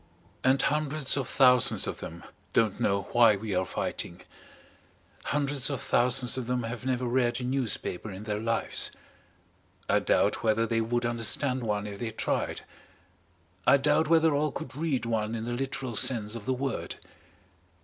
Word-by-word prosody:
And 130 +1 +4
hundreds 150 -1 +1
of 135 -2 -2
thousands 125 -3 +4
of - - -4
them 85 +1 -8 0.3
don't 110 -4 +2
know 100 0 +1
why 115 -3 +6
we 105 +1 -4
are 90 0 0
fighting. - - -4 1.0
Hundreds 140 -2 0
of 140 -3 -2
thousands 125 +1 +2
of 120 - -5
them 125 -1 -1
have 120 +3 -5
never 125 -1 0
read 120 -1 +1
a - - -5
newspaper 125 -6 -2
in 95 +1 -8
their 105 -1 -2
lives. 115 +1 -1 1.0
I - - +3
doubt - - +1
whether 115 0 +2
they 115 0 0
would 120 +1 -1
understand 120 +3 +1
one 105 -3 -1
if 100 -1 -7
they 120 - -3
tried, 110 - -2 1.1
I 140 - +7
doubt 150 +3 +2
whether 160 -1 +4
all 150 +1 +1
could 130 - -7
read 145 -5 -1
one 110 -1 -1
in 110 - -4
the 120 +1 -3
literal 130 -1 -3
sense 110 -2 +1
of 115 -3 -7
the 130 - +2
word. 135 0 -3
120 Hz, 165 wpm, -28 LUFS, 110-135 Hz, 1.1 s, I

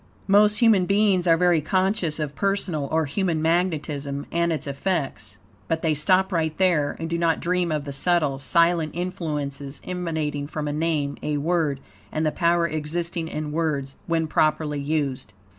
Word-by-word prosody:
Most 210 +1 +5
human 210 -6 +5
beings 200 -3 +3
are 165 -1 +5
very 175 -2 +3
conscious 185 0 0
of 150 -2 -3
personal, 190 -7 -1
or 160 0 +2
human 165 +2 -1
magnetism, 155 -4 -1
and 170 0 +1
its 160 - -2
effects. 140 - -3 0.3
But 160 0 -1
they 160 -2 +2
stop 185 +6 +2
right 160 -3 -1
there, 170 -6 +2
and 165 - -3
do 170 +1 -2
not 165 -1 +2
dream 180 -1 0
of 150 -2 -2
the 140 - -5
subtle, 150 -2 +1
silent 165 +2 +2
influences 150 -6 -4
emanating 160 -5 -3
from 150 0 -4
a 145 - -2
name, 150 -2 -1
a 150 -1 -1
word, 150 -3 0 0.3
and 155 +1 -1
the 155 - +2
power 170 0 +2
existing 165 +2 -3
in 155 -2 -4
words, 150 -4 -2
when 165 -1 +1
properly 155 -1 +1
used. 140 -6 -2
160 Hz, 165 wpm, -24 LUFS, 150-175 Hz, 0.3 s, Most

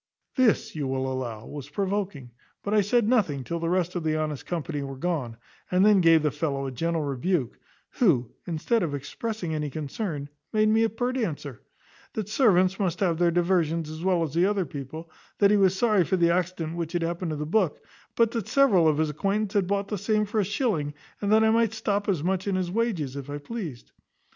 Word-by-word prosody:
This, 255 -10 +2
you 145 -3 -2
will 130 0 -1
allow, 115 -4 -5
was 145 -1 -8
provoking; 190 -7 -3 0.3
but 205 - -2
I 215 - +5
said 215 +2 +2
nothing 180 - +2
till 170 +6 -3
the 165 0 -1
rest 180 -1 0
of 175 - -2
the 155 -1 +1
honest 155 -3 -3
company 160 -4 -3
were 135 -1 -5
gone, 140 -8 -2 0.3
and 185 +2 +4
then 210 -3 +6
gave 165 -2 +5
the 150 - +2
fellow 140 -2 -2
a 135 - -3
gentle 165 +5 -1
rebuke, 140 -1 -1 0.3
who, 145 - +2 0.2
instead 180 +8 0
of 155 -5 -1
expressing 180 - -4
any 150 -1 -2
concern, 150 - -4 0.2
made 215 0 +3
me 220 +1 +4
a 225 - +2
pert 245 +4 -2
answer, 145 - -4 0.5
`That 215 -2 -3
servants 190 -6 +3
must 185 -3 -1
have 175 -5 +1
their 175 -1 +4
diversions 170 -2 +1
as 155 +2 -7
well 180 -3 +2
as 155 -1 -4
other 190 +2 +2
people; 155 +3 -8 0.3
that 200 0 +5
he 210 - +5
was 190 -1 +3
sorry 210 -4 +3
for 190 - 0
the 170 -1 +4
accident 170 -2 -2
which 170 0 -3
had 175 -1 0
happened 170 +1 -2
to 155 - -2
the 150 - -3
book, 180 -1 0 0.3
but 230 -1 +3
that 230 -5 -3
several 205 -12 +4
of 155 -2 +3
his 155 -1 +1
acquaintance 200 +6 -1
had 200 -4 +2
bought 200 0 -1
the 210 - -2
same 210 +1 +1
for 215 +1 -1
a - - +3
shilling, 195 - -1 0.3
and 205 0 0
that 220 +1 +6
I 220 - +4
might 225 -1 +2
stop 205 -2 -1
as 175 -7 0
much 190 +2 -1
in 195 - +1
his 185 -2 -1
wages, 185 - -1
if 140 0 -7
I 145 - -3
pleased.' 155 - -7
175 Hz, 215 wpm, -26 LUFS, 150-205 Hz, 0.5 s, then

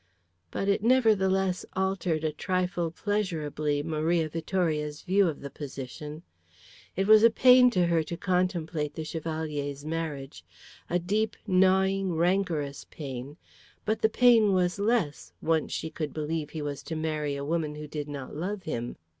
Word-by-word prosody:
But 195 - -3
it 200 0 +2
nevertheless 195 -6 +3
altered 190 -4 0
a 155 - +1
trifle 180 +1 -1
pleasurably 155 -7 -1
Maria 160 +1 0
Vittoria's 155 -2 -1
view 190 +1 +3
of 160 - -3
the 140 - -7
position. 150 +2 -7 0.7
It 195 - +1
was 215 +1 +7
pain 250 0 +7
to 180 -7 +2
her 170 -1 +2
to 170 +2 -5
contemplate 175 -5 -1
the 160 - -4
Chevalier's 155 -3 -4
marriage, 150 - -4 0.5
a 175 - +2
deep, 210 +5 0
gnawing, 190 -1 +3
rancorous 170 -5 0
pain, 135 0 -7 0.5
but 220 +1 0
the 220 - +4
pain 225 -3 +5
was 180 +1 +1
less, 200 - 0
once 160 -1 0
she 160 - -3
could 155 -3 -4
believe 155 0 -2
he 155 0 -5
was 145 -1 -4
to 165 - -5
marry 155 -2 -2
a 140 0 -4
woman 155 -1 -1
who 150 0 -7
did 150 -1 -5
not 140 -2 -6
love 190 +5 -3
him. 120 -6 -4
165 Hz, 150 wpm, -28 LUFS, 150-190 Hz, 0.7 s, was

